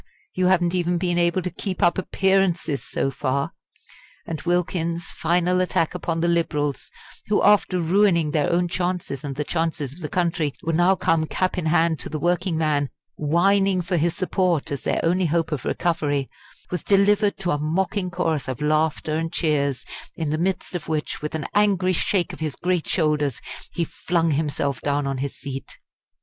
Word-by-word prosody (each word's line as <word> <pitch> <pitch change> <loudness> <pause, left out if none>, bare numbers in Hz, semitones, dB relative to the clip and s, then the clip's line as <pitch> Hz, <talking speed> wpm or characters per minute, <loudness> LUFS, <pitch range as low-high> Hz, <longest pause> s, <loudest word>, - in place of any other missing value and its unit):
you 185 0 +1
haven't 175 -2 +3
even 175 -1 +1
been 175 0 0
able 175 +1 +2
to 180 - -3
keep 185 +2 -4
up 175 - +4
appearances 185 -6 +1
so 135 - -1
far!" 140 +1 -1 0.7
And 160 -3 -5
Wilkins's 170 -1 -1
final 175 +2 +1
attack 165 -3 +1
upon 165 -2 -2
the 170 - +2
Liberals 150 -4 0 0.4
who, 210 - +2
after 200 -3 +4
ruining 170 -2 +3
their 145 -1 +1
own 175 +1 +2
chances 175 -6 -2
and 140 -2 -4
the 150 - -1
chances 160 -4 -2
of 165 - -12
the 155 -4 -5
country, 165 -5 0
were 165 - -1
now 175 +4 +4
come 165 -3 +1
cap 185 +3 0
in 180 -4 -2
hand 160 0 +2
to - - -6
the 155 - -3
working 175 +2 0
man 150 -3 +1 0.3
whining 190 +5 +2
for 180 +2 -1
his 170 0 +1
support 180 -5 0
as 140 - -3
their - - 0
only 175 +2 +2
hope 165 +1 0
of 145 -5 -3
recovery 145 -5 0 0.4
was 180 - -2
delivered 200 +1 +3
to 180 -2 -1
a 145 - 0
mocking 185 +5 -1
chorus 165 -6 -1
of 130 -3 -4
laughter 155 0 +1
and 165 +1 -2
cheers, 140 -6 0 0.3
in 160 -3 -2
the 155 - -1
midst 185 +2 -1
of 175 - -4
which, 155 -1 -2
with 150 +1 -4
an 155 - -3
angry 195 -3 +3
shake 180 0 +1
of - - -9
his 155 -5 -3
great 180 -2 -1
shoulders, 150 - +1 0.3
he 170 - -1
flung 165 0 0
himself 145 -2 -1
down 145 0 0
on 135 -1 -2
his 140 0 -3
seat. 135 -1 -7
170 Hz, 185 wpm, -23 LUFS, 150-180 Hz, 0.7 s, up